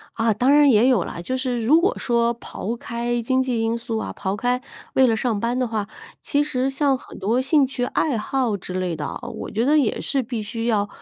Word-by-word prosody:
啊， 225 0 +2
当 245 +6 +2
然 295 -1 +6
也 235 0 +5
有 245 -9 +3
了， 170 - -6
就 255 - -2
是 250 -3 -2
如 310 +7 +5
果 400 +7 +1
说 235 -1 +1
抛 230 -1 -5
开 240 0 -3
经 260 +3 +1
济 245 -3 -1
因 225 +1 0
素 230 -1 -4
啊， - - -4
抛 190 0 -3
开 245 +4 0 0.3
为 265 -1 +5
了 225 -2 +2
上 225 -2 0
班 235 +3 -1
的 255 -1 0
话， 215 -3 -2 0.3
其 285 +1 +1
实 265 -3 -1
像 270 0 +1
很 260 - -11
多 225 +6 +1
兴 280 +1 +3
趣 255 -1 -3
爱 270 +2 0
好 235 +1 0
之 185 -1 -7
类 185 -2 -1
的 150 -1 -4
啊， - - -6
我 - - -6
觉 225 +3 0
得 295 +3 +4
也 245 -7 0
是 275 -1 0
必 235 -2 -4
须 230 +2 -4
要 210 -3 +1
240 Hz, 255 characters per minute, -22 LUFS, 220-260 Hz, 0.3 s, 然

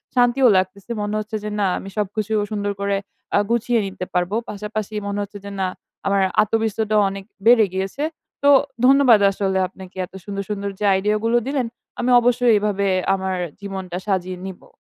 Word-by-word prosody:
শান্তিও 245 +1 +4
লাগতেছে। 185 +4 -2
মনে 205 +1 -2
হচ্ছে 215 +1 -5
যে 210 - -3
না 200 - +2
আমি 195 - -7
সবকিছু 210 +1 -2 0.2
সুন্দর 205 -1 -1
করে 200 0 +1 0.4
আ - - +5
গুছিয়ে 235 0 +2
নিতে 190 -1 -5
পারব। 180 +1 0 0.2
পাশাপাশি 210 +1 -5
মনে 200 0 -2
হচ্ছে 205 0 -9
যে 200 - -6
না, 190 - +1 0.4
আমার 200 0 +3 0.2
আত্মবিশ্বাসটা 220 0 0
অনেক 195 0 -7 0.2
বেড়ে 230 -2 +7
গিয়েছে। 190 +9 -3 0.4
তো 285 - +6 0.4
ধন্যবাদ 265 -4 +6
আসলে 195 -1 -1
আপনাকে 185 0 -13
এত - - -26
সুন্দর, 200 -1 -4
সুন্দর 200 -1 -2
যে 210 - -1
আইডিইয়া 205 +3 +1
গুলো 235 +1 +3
দিলেন। 275 -2 0 0.3
আমি 245 - 0
অবশ্যই 245 0 +3
এভাবে 200 -1 0 0.3
আমার 190 -1 -1 0.3
জীবনটা 190 -3 -5
সাজিয়ে 185 -2 -1
নিবো। 190 -2 -10
205 Hz, 170 wpm, -21 LUFS, 195-225 Hz, 0.4 s, বেড়ে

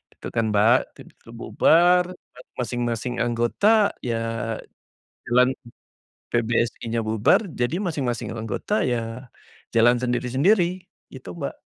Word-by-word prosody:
gitu - - -9
kan, 115 -1 +1
Mbak. 110 +5 +5 0.2
Tim - - -13 0.2
tuh - - -14
bubar, 175 +2 +4
eee, 125 - -18 0.2
masing-masing 120 0 -2
anggota 200 - +2
ya 115 -1 -3 0.7
jalan 125 +1 +4 0.8
PBSI-nya 115 0 -1
bubar 110 - +3
jadi 120 +5 -2
masing-masing 130 -9 -2
anggota 115 - -2
ya 120 +1 -3 0.4
jalan 120 +2 +5
sendiri-sendiri, 170 - +1 0.3
gitu, 130 - -9
Mbak. 140 -3 -4
120 Hz, 110 wpm, -23 LUFS, 115-140 Hz, 0.8 s, Mbak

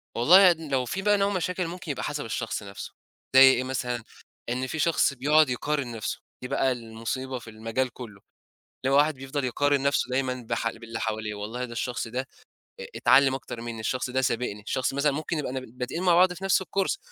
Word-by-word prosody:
والله، 180 +10 +7
لو 140 -6 -2
في 190 +10 -3
بقى 205 +1 +3
نوع 200 0 +2
مشاكل، 180 -1 -1
ممكن 175 -2 -5
يبقى 140 - -4
حسّب 145 -2 -3
الشخص 115 -1 -3
نفسه، 100 0 -8 0.4
زي 130 - +10
إيه 130 -2 +7
مثلًا، 125 -2 -3 0.5
إن 125 +2 -2
في 160 - -4
شخص 160 -2 +2
بيقعد 150 +3 +4
يقارن 135 0 -2
نَفْسه، 110 - -4 0.2
دي 125 - -5
بقى 130 +1 +1
المصيبة 120 +2 -4
في 115 - -12
المجال 115 +4 -2
كلّه. 105 -6 -10 0.6
اللي 135 - +2
هو - - +6
واحد 150 +1 +4
بيفضل 135 +1 -4
يقارن 145 +3 +1
نفسه 140 -3 +1
دايمًا 130 -1 -1
بح 115 - 0
باللي 115 0 -8
حواليه، 110 -1 -3
والله، 110 +5 -4
ده 120 - -11
الشخص 120 0 -3
ده 130 +3 -4 0.5
آآ - - -6
اتعلم 135 0 +5
أكتر 130 -3 -6
مني، 115 -1 -6
الشخص 125 +3 -2
ده 130 +1 +1
سابقني، 115 -4 -1
الشخص 130 +5 -1
مثلًا 140 +1 +2
ممكن 155 +3 -3
يبقى 140 -4 -3
نب 130 -2 -7
بادئين 130 +7 -3
مع 180 -2 +4
بعض 180 +1 +5
في 185 +2 -9
نفس 195 0 +3
الcourse، 195 0 -1
130 Hz, 205 wpm, -26 LUFS, 120-150 Hz, 0.6 s, زي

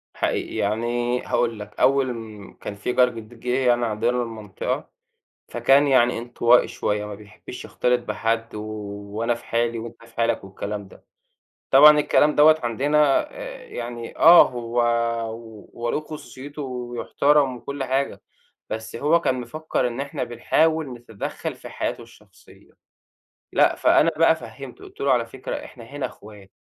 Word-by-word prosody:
حقيقي. - - -2
يعني 120 +4 -1
هاقول 115 -3 0
لك، 105 0 -10
أول 135 -2 +3
م 110 -3 -10
كان 100 - -6
في 105 +5 -3
جار 125 0 +5
جديد 115 0 -11
جِه 125 +2 -1
يعني 120 0 +3
عندنا 120 +3 0
المنطقة، 110 -4 -5 0.6
فكان 140 +2 +4
يعني 120 -3 +4
انطوائي 120 0 +3
شوية 105 0 -2
ما 105 - -7
بيحبّش 105 +4 -11
يختلط 125 0 +1
بحد 115 0 -2
و 105 - -4 0.6
وأنا 115 +1 +1
في - - -13
حالي 115 0 0
وأنت 115 0 -10
في 115 - -21
حالك 115 -2 0
والكلام 100 +1 -6
ده. - - -18 0.7
طبعًا 150 +2 +8
الكلام 150 0 +3
دوّة 155 +1 +6
عندنا 140 +4 +2
آآ - - -9
يعني 120 - -7
آه، 170 +2 +8
هو 120 -2 -6 0.5
و 110 -2 -11
هو 120 0 -2
له - - -1
خصوصيته 150 -1 -9
و - - -4 0.3
وبيحترم 140 +1 +2
وكل 140 +2 -5
حاجة، 135 +2 -1 0.5
بس 110 +1 -5
هو 155 +6 +3
كان 130 -5 0
مفكّر 145 +1 -2
إن 120 +2 -5
إحنا 140 -2 -3
بنحاول 155 +6 +1
نتدخّل 120 -4 -6
في - - -11
حياته - - -4
الشخصية. - - -19 0.8
لأ، - - +4
فأنا - - +4
بقى - - +5
فهمِّته - - -10
قُلت - - -15
له: 140 -1 +2
"على 120 -2 +1
فكرة 130 +2 -6
إحنا 120 -3 -12
هنا 140 +1 -4
إخوات، 105 -4 -14
120 Hz, 155 wpm, -23 LUFS, 115-140 Hz, 0.8 s, طبعًا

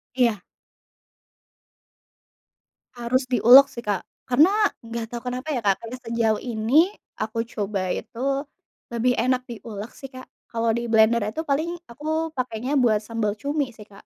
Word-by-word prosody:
Iya. 235 -7 +2 2.5
Harus 250 +2 0
diulek 250 +2 +8
sih 235 - -6
Kak, 205 -5 -2 0.2
karena 380 +12 +4 0.2
gak 230 0 -5
tau 240 0 -6
kenapa 250 +4 -4
ya 250 -7 -2
Kak 195 -1 +2
karena 230 +2 -7
sejauh 230 -3 0
ini 250 - +2 0.2
aku 220 +1 -2
coba 205 -4 -3
itu, 275 +8 -2 0.5
lebih 245 +2 +1
enak 255 +2 +2
diulek 215 -1 -7
sih 270 - -9
Kak, 255 0 -10 0.2
kalau 230 0 -1
di 235 - -3
blender 225 -1 +4
itu 220 +9 -3
paling 315 +3 -1 0.2
aku 315 +6 -2
pakainya 255 +2 -1
buat 225 -5 +3
sambal 220 -1 -2
cumi 280 +3 -2
sih 215 -1 -14
Kak. 200 -1 -16
235 Hz, 145 wpm, -24 LUFS, 220-260 Hz, 2.5 s, diulek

